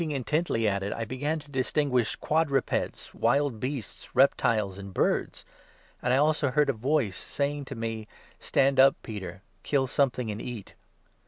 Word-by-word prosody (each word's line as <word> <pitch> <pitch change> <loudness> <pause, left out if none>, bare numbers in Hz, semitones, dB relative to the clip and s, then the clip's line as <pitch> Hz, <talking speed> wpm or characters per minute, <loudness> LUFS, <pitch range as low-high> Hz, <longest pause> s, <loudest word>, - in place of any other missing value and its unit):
225 150 -4 -1
intently 150 -9 +2
at 100 -1 0
it, 100 +1 -3
I 115 - -3
began 145 +7 -2
to 150 -2 -12
distinguish 130 -2 +1
quadrupeds, 150 -4 -1
wild 135 0 +1
beasts, 130 -2 -6
reptiles, 110 -7 +3
and 100 0 -8
birds; - - 0 0.6
and 125 - 0
I 130 - +4
also 150 0 +2
heard 140 +2 +3
a - - -6
voice 125 -3 0
saying 145 0 -3
to 135 - -7
7 - - -9
me 115 -1 -4
— - - -27
'Stand 135 0 +2
up, 135 +1 +7
Peter, 95 -3 -7 0.2
kill 140 -2 +1
something 125 -3 0
and 105 +2 -5
eat.' 120 -5 -7
130 Hz, 170 wpm, -28 LUFS, 110-145 Hz, 0.6 s, up